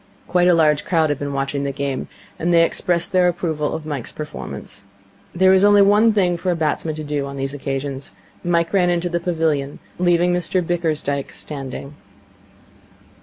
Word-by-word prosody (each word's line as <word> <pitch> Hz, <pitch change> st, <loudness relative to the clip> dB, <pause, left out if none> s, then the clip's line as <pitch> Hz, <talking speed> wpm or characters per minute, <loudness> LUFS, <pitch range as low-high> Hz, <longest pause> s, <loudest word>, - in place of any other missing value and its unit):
Quite 180 Hz, -1 st, +3 dB
a 180 Hz, -, +5 dB
large 155 Hz, -2 st, +3 dB
crowd 160 Hz, -4 st, +1 dB
had 145 Hz, -, -2 dB
been 145 Hz, 0 st, -3 dB
watching 140 Hz, 0 st, -2 dB
the 140 Hz, -, -1 dB
game, 140 Hz, -1 st, -3 dB, 0.3 s
and 170 Hz, +2 st, 0 dB
they 170 Hz, -1 st, +6 dB
expressed 170 Hz, 0 st, 0 dB
their 185 Hz, -1 st, +4 dB
approval 160 Hz, -4 st, -1 dB
of 160 Hz, -, -6 dB
Mike's 145 Hz, -6 st, -5 dB
performance. 100 Hz, -9 st, -8 dB, 0.5 s
There 190 Hz, +1 st, +5 dB
is 190 Hz, 0 st, +4 dB
only 205 Hz, 0 st, +6 dB
one 210 Hz, +3 st, +5 dB
thing 180 Hz, -5 st, +1 dB
for 180 Hz, +2 st, -3 dB
a 175 Hz, -, +2 dB
batsman 155 Hz, 0 st, -1 dB
to 155 Hz, -, -6 dB
do 145 Hz, -2 st, -2 dB
on 140 Hz, 0 st, -7 dB
these 135 Hz, +1 st, -3 dB
occasions. 135 Hz, -1 st, -5 dB, 0.3 s
Mike 170 Hz, 0 st, +1 dB
ran 180 Hz, -3 st, +3 dB
into 175 Hz, 0 st, 0 dB
the 170 Hz, 0 st, -1 dB
pavilion, 160 Hz, -5 st, -1 dB, 0.2 s
leaving 175 Hz, 0 st, +3 dB
Mr 180 Hz, +1 st, 0 dB
Bickersdyke 155 Hz, -5 st, -1 dB
standing. 140 Hz, -1 st, -7 dB
160 Hz, 175 wpm, -20 LUFS, 140-175 Hz, 0.5 s, they